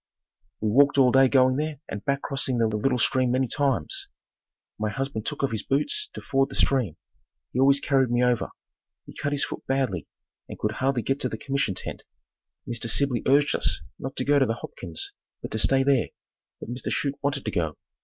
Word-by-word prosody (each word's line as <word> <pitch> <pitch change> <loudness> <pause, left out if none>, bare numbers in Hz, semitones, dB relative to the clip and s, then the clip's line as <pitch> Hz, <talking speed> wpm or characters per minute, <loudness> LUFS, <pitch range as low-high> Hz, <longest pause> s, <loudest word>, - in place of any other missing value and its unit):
We 110 - +1
walked 140 +4 +5
all 130 -2 +6
day 135 +1 +6
going 130 0 +4
there 150 -1 -2
and 105 - -6
back 140 0 -1
crossing 135 -2 -1
the 115 - +3
little 110 +4 +1
stream 125 +2 +2
many 130 +2 +2
times. 145 - -1 0.7
My 110 0 0
husband 135 -3 -3
took 150 - -3
off 140 - +1
his 110 -2 -1
boots 290 - 0
to - - -7
ford 135 0 +1
the 135 - -6
stream. 125 - +1 0.6
He 125 - -1
always 135 +1 +5
carried 135 -3 +2
me 120 +1 +2
over. 125 -1 +1 0.6
He - - -12
cut 145 - -3
his 145 -1 +1
foot - - -7
badly 130 - -1 0.4
and - - -7
could 105 - -1
hardly 130 +1 0
get 135 +1 0
to 130 - -1
the 110 - -5
commission 135 -6 -1
tent. - - -6 0.7
Mr. 115 -1 -3
Sibley 130 0 +1
urged 145 +2 +4
us - - +1 0.2
not 135 +1 -5
to 130 - -1
go 145 0 +4
to 135 - +3
the 115 - 0
Hopkins', 85 -7 -6 0.3
but - - -6
to 110 - -2
stay 135 +4 +4
there, 135 -3 +3 0.5
but - - -8
Mr. 125 - -3
Chute 140 -1 -1
wanted 140 -1 -1
to 110 - -1
go. 80 -5 -1
135 Hz, 205 wpm, -26 LUFS, 115-140 Hz, 0.7 s, all